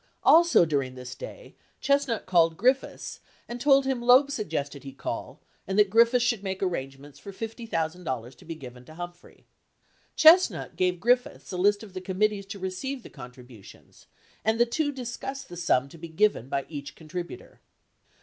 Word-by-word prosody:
Also 335 Hz, -, +6 dB
during 140 Hz, -5 st, -1 dB
this 125 Hz, 0 st, -8 dB
day -, -, -10 dB, 0.3 s
Chestnut 280 Hz, -5 st, +1 dB
called 165 Hz, -3 st, +3 dB
Griffiths 255 Hz, +5 st, 0 dB, 0.3 s
and 240 Hz, 0 st, -7 dB
told 275 Hz, -1 st, +5 dB
him 265 Hz, -2 st, 0 dB
that 240 Hz, -, -8 dB
Loeb 265 Hz, +3 st, +6 dB
suggested 150 Hz, -, -4 dB
he 135 Hz, -1 st, -9 dB
call 135 Hz, -, -6 dB, 0.3 s
and 190 Hz, +1 st, -2 dB
that 205 Hz, -2 st, +4 dB
Griffiths 235 Hz, +2 st, +4 dB
should 235 Hz, -4 st, 0 dB
make 190 Hz, -1 st, -4 dB
arrangements 140 Hz, -4 st, -5 dB
for 200 Hz, -, -9 dB
$50,000 165 Hz, -, -4 dB
to -, -, -18 dB
be 165 Hz, -, -6 dB
given 125 Hz, -4 st, -11 dB
to 155 Hz, -, -14 dB
Humphrey. 175 Hz, +1 st, -10 dB, 0.7 s
Chestnut 335 Hz, +4 st, +5 dB
gave 180 Hz, -1 st, 0 dB
Griffiths 245 Hz, +4 st, 0 dB
a 180 Hz, -, -4 dB
list 205 Hz, +3 st, +2 dB
of 200 Hz, -4 st, -12 dB
the 185 Hz, -, -6 dB
committees 195 Hz, +2 st, -1 dB
to 200 Hz, +1 st, -7 dB
receive 200 Hz, +8 st, -4 dB
the -, -, -12 dB
contribu 125 Hz, -4 st, -12 dB
tions -, -, -17 dB, 0.4 s
and 220 Hz, +1 st, +1 dB
the 240 Hz, -, +6 dB
two 290 Hz, +5 st, -1 dB
discussed 265 Hz, +1 st, -6 dB
the 175 Hz, -, -8 dB
sum 150 Hz, -6 st, +1 dB
to 165 Hz, -, -14 dB
be 170 Hz, +1 st, -8 dB
given 160 Hz, -, +1 dB
by 140 Hz, 0 st, -2 dB
each 140 Hz, -3 st, -8 dB
contributor. 170 Hz, +2 st, -8 dB
185 Hz, 175 wpm, -27 LUFS, 150-240 Hz, 0.7 s, Also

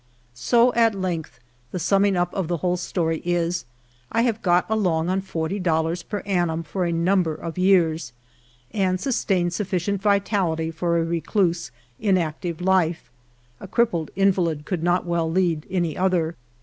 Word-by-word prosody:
So 240 Hz, -, +3 dB
at 230 Hz, -2 st, +3 dB
length 180 Hz, -4 st, -4 dB, 0.3 s
the -, -, -5 dB
summing 195 Hz, +3 st, +2 dB
up 175 Hz, 0 st, 0 dB
of 190 Hz, -4 st, -2 dB
the 175 Hz, 0 st, -1 dB
whole 180 Hz, +2 st, 0 dB
story 165 Hz, -2 st, -2 dB
is, 175 Hz, 0 st, -1 dB, 0.5 s
I 230 Hz, -, +2 dB
have 230 Hz, -3 st, 0 dB
got 175 Hz, -1 st, +2 dB
along 180 Hz, -7 st, +1 dB
on 190 Hz, +1 st, +1 dB
forty 185 Hz, +1 st, -3 dB
dollars 165 Hz, -1 st, 0 dB
per 205 Hz, +4 st, -5 dB
annum 175 Hz, -4 st, 0 dB
for 175 Hz, +4 st, -2 dB
a 170 Hz, -, 0 dB
number 170 Hz, -1 st, +1 dB
of 165 Hz, +1 st, -6 dB
years, 170 Hz, -8 st, +3 dB, 0.6 s
and 185 Hz, -3 st, 0 dB
sustained 185 Hz, -7 st, 0 dB
sufficient 195 Hz, 0 st, -1 dB
vitality 195 Hz, -5 st, +1 dB
for 170 Hz, +1 st, 0 dB
a 165 Hz, -, +2 dB
recluse, 170 Hz, -, 0 dB, 0.3 s
inactive 175 Hz, -4 st, -1 dB
life; 175 Hz, -7 st, +1 dB, 0.5 s
a -, -, -9 dB
crippled 185 Hz, -7 st, +1 dB
invalid 180 Hz, -6 st, +1 dB
could 180 Hz, -4 st, -2 dB
not 175 Hz, +1 st, +1 dB
well 170 Hz, -2 st, 0 dB
lead 170 Hz, -3 st, 0 dB
any 175 Hz, -4 st, -1 dB
other. 180 Hz, -3 st, +1 dB
175 Hz, 155 wpm, -23 LUFS, 165-195 Hz, 0.6 s, So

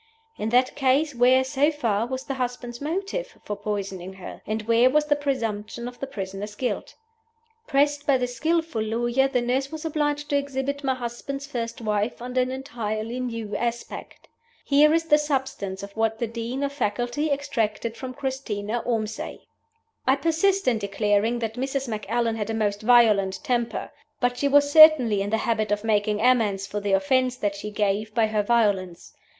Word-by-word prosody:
In 215 Hz, -, -3 dB
that 250 Hz, +2 st, +3 dB
case, 280 Hz, +2 st, +2 dB
where 255 Hz, +2 st, +4 dB
(so 275 Hz, +3 st, +2 dB
far) 235 Hz, -8 st, 0 dB
was 260 Hz, +1 st, -4 dB
the 275 Hz, -, -4 dB
husband's 245 Hz, -1 st, -4 dB
motive 395 Hz, +10 st, -3 dB
for 205 Hz, -, -4 dB
poisoning 195 Hz, -3 st, -4 dB
her? 190 Hz, -1 st, -10 dB
and 215 Hz, 0 st, -2 dB
where 230 Hz, +3 st, +4 dB
was 300 Hz, +3 st, +2 dB
the 295 Hz, -1 st, +2 dB
presumption 235 Hz, -5 st, -3 dB
of 245 Hz, 0 st, -9 dB
the 275 Hz, -, -4 dB
prisoner's 200 Hz, -3 st, -6 dB
guilt? 250 Hz, +3 st, -3 dB, 0.7 s
Pressed 290 Hz, 0 st, +1 dB
by 275 Hz, -2 st, +5 dB
this 250 Hz, -1 st, -3 dB
skillful 320 Hz, -3 st, 0 dB
lawyer, 240 Hz, +4 st, +1 dB
the 250 Hz, -2 st, 0 dB
nurse 260 Hz, +3 st, -1 dB
was 315 Hz, 0 st, -6 dB
obliged 295 Hz, -2 st, -1 dB
to 285 Hz, -, +3 dB
exhibit 280 Hz, 0 st, -3 dB
my 265 Hz, -1 st, +1 dB
husband's 255 Hz, +3 st, -5 dB
first 235 Hz, -4 st, -5 dB
wife 210 Hz, 0 st, -1 dB
under 250 Hz, +1 st, -1 dB
an 250 Hz, -, 0 dB
entirely 240 Hz, -3 st, -4 dB
new 230 Hz, -4 st, -4 dB
aspect. 235 Hz, +2 st, -5 dB, 0.4 s
Here 295 Hz, +2 st, +5 dB
is 330 Hz, +1 st, +3 dB
the 300 Hz, -2 st, +4 dB
substance 265 Hz, -10 st, -2 dB
of 200 Hz, 0 st, -9 dB
what 225 Hz, 0 st, 0 dB
the 235 Hz, -, -1 dB
Dean 235 Hz, +4 st, -4 dB
of 280 Hz, 0 st, -2 dB
Faculty 245 Hz, +4 st, -1 dB
extracted 230 Hz, -6 st, -1 dB
from 255 Hz, +2 st, -7 dB
Christina 240 Hz, -5 st, -3 dB
Ormsay: 220 Hz, -2 st, -3 dB, 0.7 s
"I 265 Hz, -, +5 dB
persist 335 Hz, +6 st, +1 dB
in 235 Hz, -3 st, +3 dB
declaring 205 Hz, +3 st, +1 dB
that 225 Hz, -2 st, -3 dB
Mrs. 270 Hz, 0 st, -2 dB
Macallan 225 Hz, +1 st, -1 dB
had 210 Hz, 0 st, -3 dB
a 225 Hz, -, -1 dB
most 205 Hz, -2 st, -1 dB
violent 215 Hz, -2 st, +4 dB
temper. 240 Hz, -5 st, -1 dB, 0.3 s
But 245 Hz, -1 st, +1 dB
she 280 Hz, -, 0 dB
was 285 Hz, +1 st, +4 dB
certainly 290 Hz, -10 st, +7 dB
in 200 Hz, -, -2 dB
the 220 Hz, -, +1 dB
habit 215 Hz, -2 st, 0 dB
of 205 Hz, 0 st, 0 dB
making 210 Hz, -1 st, +1 dB
amends 220 Hz, -6 st, +2 dB
for 205 Hz, +1 st, -4 dB
the 200 Hz, -1 st, -1 dB
offense 255 Hz, +4 st, +2 dB
that 205 Hz, -5 st, -1 dB
she 205 Hz, +1 st, -6 dB
gave 210 Hz, +1 st, -1 dB
by 230 Hz, -, +4 dB
her 215 Hz, -1 st, 0 dB
violence. 205 Hz, -6 st, 0 dB
240 Hz, 180 wpm, -25 LUFS, 215-275 Hz, 0.7 s, certainly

